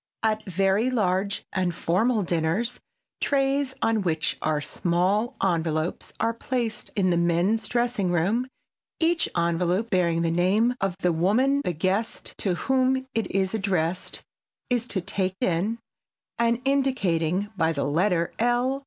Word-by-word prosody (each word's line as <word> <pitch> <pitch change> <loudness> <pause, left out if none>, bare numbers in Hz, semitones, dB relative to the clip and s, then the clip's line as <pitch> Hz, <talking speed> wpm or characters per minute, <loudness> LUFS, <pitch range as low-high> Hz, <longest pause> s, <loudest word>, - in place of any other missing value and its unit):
At 220 -1 +1
very 195 +6 +2
large 200 -4 0
and 180 -3 0
formal 215 +7 +1
dinners 175 +8 -1 0.4
trays 275 -1 +1
on 225 -1 +2
which 160 -4 -1
are 155 -1 +1
small 185 +9 0
envelopes 165 -2 -1
are 225 +1 +1
placed 230 -1 -3
in 185 -3 +2
the 170 - +2
men's 175 +6 +1
dressing 240 -6 0
room, 200 +9 +1 0.5
each 330 0 +2
envelope 175 +6 0
bearing 170 -3 +2
the 165 - +1
name 195 +8 +2
of 195 -2 0
the 180 - +3
woman 230 +12 +2
the 180 - -1
guest 190 +7 -2
to 185 -4 0
whom 260 +3 +1
it 225 - -1
is 190 0 0
addressed 185 -4 -1 0.5
is 245 -1 +1
to 195 -5 -1
take 185 +1 -2
in, 185 +6 0 0.6
and 235 +1 +2
indicating 200 - +1
by 165 -3 +2
the 145 -3 -2
letter 170 +3 +1
L. 245 +3 +1
195 Hz, 140 wpm, -25 LUFS, 175-235 Hz, 0.6 s, the